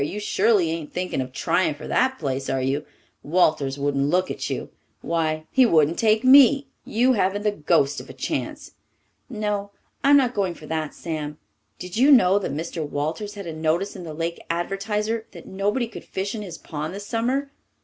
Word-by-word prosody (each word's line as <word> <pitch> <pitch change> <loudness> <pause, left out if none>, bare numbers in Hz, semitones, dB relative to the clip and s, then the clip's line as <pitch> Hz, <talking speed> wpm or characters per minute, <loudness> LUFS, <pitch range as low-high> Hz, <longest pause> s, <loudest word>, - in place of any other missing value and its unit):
You 195 +8 -3
surely 205 -4 +2
ain't 165 -2 -5
thinking 180 -6 -2
of 130 0 -5
trying 150 +4 +1
for 155 - -9
that 260 0 +1
place, 135 -3 -3
are 135 - 0
you? 135 +3 -1 0.3
Walters 150 -4 +1
wouldn't 140 0 0
look 185 +3 +1
at - - -4
you. - - -4 0.3
Why, 155 -2 -1
he 265 - +5
wouldn't 165 -7 +3
take 220 0 +3
me! 275 +1 +7 0.2
You 250 +4 +3
haven't 200 -1 0
the 210 - +2
ghost 145 -5 +1
of - - -14
a - - -8
chance." - - -4 0.6
"No, 210 -3 -2 0.3
I'm 285 +1 +7
not 255 -3 +2
going 190 -5 -1
for 155 - -12
that. 155 -1 -3
Sam, 150 -3 -5 0.4
did 180 +2 -7
you 270 +5 +6
know 200 -7 +6
that 195 - -3
Mr. 160 +2 -4
Walters 155 +9 -3
had 200 -2 -7
a 165 - -5
notice 160 +6 -1
in 185 - -8
the 160 -2 -7
Lake 165 +1 -3
Advertiser 210 +6 -2
that - - -11
nobody 205 +6 -1
could 225 - -10
fish 195 +2 -4
in 220 - -4
his 180 -5 -7
pond 155 +3 -5
this 200 0 -7
summer?" 255 +6 -1
185 Hz, 190 wpm, -24 LUFS, 155-215 Hz, 0.6 s, me